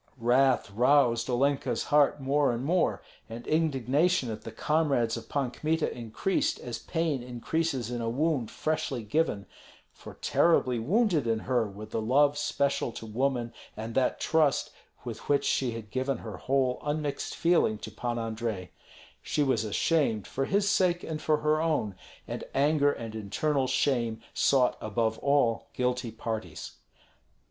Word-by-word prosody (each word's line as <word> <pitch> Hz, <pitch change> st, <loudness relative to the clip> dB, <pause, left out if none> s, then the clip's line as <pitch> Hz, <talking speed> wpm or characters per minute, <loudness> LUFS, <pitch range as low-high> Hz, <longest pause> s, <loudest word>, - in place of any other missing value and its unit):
Wrath 125 Hz, -1 st, +3 dB
roused 125 Hz, +1 st, +3 dB
Olenka's 135 Hz, +3 st, +1 dB
heart 145 Hz, 0 st, +3 dB
more 140 Hz, +1 st, +2 dB
and 120 Hz, +3 st, -3 dB
more, 175 Hz, +4 st, +1 dB, 0.3 s
and 115 Hz, +1 st, -8 dB
indignation 150 Hz, -1 st, +1 dB
at 110 Hz, -, -6 dB
the 115 Hz, -, -8 dB
comrades 140 Hz, -4 st, +1 dB
of 115 Hz, -, -8 dB
Pan 140 Hz, -4 st, -1 dB
Kmita 155 Hz, +4 st, -1 dB
increased 120 Hz, -, -1 dB
as 120 Hz, -2 st, -5 dB
pain 160 Hz, -6 st, -1 dB
increases 125 Hz, +1 st, -2 dB
in 120 Hz, -1 st, -3 dB
a 115 Hz, -, -1 dB
wound 140 Hz, -1 st, 0 dB
freshly 145 Hz, -6 st, -2 dB
given; 105 Hz, -3 st, 0 dB, 0.5 s
for -, -, -12 dB
terribly 130 Hz, -8 st, +2 dB
wounded 170 Hz, -, +2 dB
in 115 Hz, -1 st, 0 dB
her 120 Hz, -4 st, 0 dB
were 100 Hz, +2 st, -9 dB
the 110 Hz, +1 st, -3 dB
love 140 Hz, +6 st, +3 dB
special 140 Hz, -3 st, 0 dB
to -, -, -8 dB
woman 120 Hz, +1 st, -1 dB, 0.2 s
and 115 Hz, +1 st, -5 dB
that 130 Hz, 0 st, +1 dB
trust 155 Hz, -3 st, +2 dB, 0.3 s
with -, -, -7 dB
which 145 Hz, -1 st, +3 dB
she 125 Hz, -3 st, +1 dB
had 110 Hz, -3 st, -8 dB
given 130 Hz, +1 st, -1 dB
her 110 Hz, -2 st, -8 dB
whole 130 Hz, -2 st, 0 dB
unmixed 150 Hz, -1 st, -2 dB
feeling 165 Hz, -11 st, +2 dB
to -, -, -8 dB
Pan 120 Hz, -1 st, -3 dB
Andrei. 110 Hz, -4 st, -3 dB, 0.5 s
She 150 Hz, -, 0 dB
was 130 Hz, -5 st, +1 dB
ashamed, 110 Hz, -, +1 dB
for 135 Hz, -, -2 dB
his 200 Hz, +4 st, +1 dB
sake 185 Hz, -4 st, +2 dB
and 155 Hz, -1 st, -4 dB
for 155 Hz, -1 st, +1 dB
her 155 Hz, +1 st, +2 dB
own, 155 Hz, -11 st, 0 dB, 0.3 s
and -, -, -5 dB
anger 145 Hz, +1 st, +3 dB
and 115 Hz, -5 st, -6 dB
internal 130 Hz, +6 st, -1 dB
shame 115 Hz, -5 st, 0 dB
sought 130 Hz, -3 st, +3 dB
above 110 Hz, +1 st, -1 dB
all 140 Hz, -5 st, +2 dB
guilty 125 Hz, -1 st, -1 dB
parties. 110 Hz, 0 st, -5 dB
130 Hz, 155 wpm, -28 LUFS, 115-150 Hz, 0.5 s, Wrath